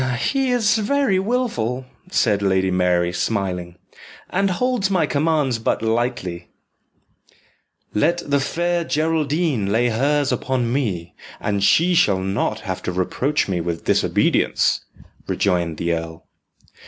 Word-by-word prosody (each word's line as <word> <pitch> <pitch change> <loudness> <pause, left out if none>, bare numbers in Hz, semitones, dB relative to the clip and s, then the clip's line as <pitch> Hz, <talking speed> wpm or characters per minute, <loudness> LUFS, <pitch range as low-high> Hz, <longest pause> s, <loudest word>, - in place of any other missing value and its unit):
"He 270 - 0
is 225 -3 +2
very 220 -3 +1
wilful," 190 - -1 0.2
said 105 - +2
Lady 95 -1 +1
Mary, 90 -1 +1
smiling, 90 -4 -2 0.6
"and 195 +1 +1
holds 230 +1 0
my 180 -5 +2
commands 145 -5 +1
but 110 - -1
lightly." 110 -7 -2 1.5
"Let 170 +12 +1
the 140 0 +2
Fair 170 +5 -1
Geraldine 155 - 0
lay 120 +3 +2
hers 140 +5 +1
upon 125 -3 -1
me, 95 -11 -2 0.3
and 100 -2 -1
she 165 - +4
shall 100 - +4
not 100 +3 -1
have 95 -3 -4
to - - -3
reproach 125 +11 0
me 90 -3 -1
with 85 0 -4
disobedience," - - +2 0.5
rejoined 85 -4 0
the 85 0 0
earl. 80 0 -5
120 Hz, 125 wpm, -21 LUFS, -, 1.5 s, she